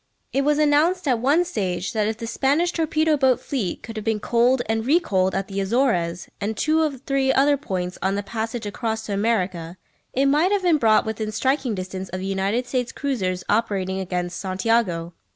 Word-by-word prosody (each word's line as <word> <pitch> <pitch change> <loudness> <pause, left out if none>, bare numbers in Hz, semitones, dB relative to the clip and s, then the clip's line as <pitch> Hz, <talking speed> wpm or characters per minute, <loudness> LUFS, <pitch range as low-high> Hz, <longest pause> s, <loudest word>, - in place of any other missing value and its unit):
It 275 - +2
was 295 +1 +2
announced 305 +4 +2
at 250 -4 +2
one 290 +9 +3
stage 185 - -2
that 215 -2 +1
if 220 0 -2
the 235 - -6
Spanish 280 +9 +1
torpedo 315 -2 +1
boat 260 -3 +3
fleet 245 -9 -3
could 225 -1 -8
have 215 - -4
been 220 -1 0
coaled 240 +3 +2
and 225 0 0
re 295 +8 +4
coaled 190 - 0
at 195 0 -2
the 195 0 -3
Azores, 190 -6 0
and 210 +1 -2
two 315 +1 +2
or 300 -4 0
three 270 +1 0
other 280 +2 +4
points 185 -9 -4
on 190 +1 0
the 205 - -2
passage 225 +2 -4
across 220 +1 -3
to 205 - -3
America, 185 -5 -1 0.3
it 270 +2 +1
might 300 +7 +3
have 405 -2 +1
been 335 -4 +3
brought 220 -3 +4
within 220 -1 -3
striking 260 +1 0
distance 185 0 -5
of 185 - -5
the 190 - -5
United 195 +5 -1
States 250 -1 -2
cruisers 190 -10 -2
operating 195 -4 0
against 180 -1 -3
Santiago. 185 -3 0
225 Hz, 200 wpm, -23 LUFS, 190-275 Hz, 0.3 s, re